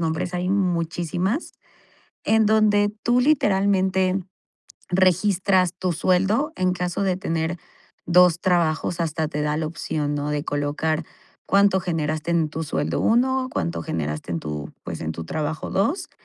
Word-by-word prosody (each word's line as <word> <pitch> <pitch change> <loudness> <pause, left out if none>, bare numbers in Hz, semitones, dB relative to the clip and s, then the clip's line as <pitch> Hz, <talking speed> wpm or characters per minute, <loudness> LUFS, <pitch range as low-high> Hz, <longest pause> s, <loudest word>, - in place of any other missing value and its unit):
nombres. 165 +2 -2
Hay 180 +1 -1
muchísimas 180 - -1 0.7
en 220 0 +3
donde 210 -1 +3
tú, 240 +1 +3
literalmente, 195 -8 +2 0.7
registras 185 0 +2
tu 185 0 -1
sueldo, 195 - +1
en 185 0 +1
caso 180 +1 -2
de 185 -2 0
tener 165 -1 -2 0.5
2 175 -1 +5
trabajos 170 -2 +1
hasta 160 -1 -1
te 150 -1 -3
da 150 0 0
la 155 -1 -1
opción, 150 -2 -3
¿no?, 145 0 -2
de 145 0 -1
colocar 150 +3 -1 0.4
cuánto 200 -1 +4
generaste 160 -2 -2
en 165 -3 +1
tu 160 +1 -4
sueldo 150 - -2
1, 255 +3 +2
cuánto 85 0 -2
generaste 75 +1 -4
en 85 - -1
tu, 75 -1 -6
pues, 80 - -6
en 80 0 -2
tu 80 - -6
trabajo 155 - -3
2 225 - 0
175 Hz, 145 wpm, -23 LUFS, 155-195 Hz, 0.7 s, 2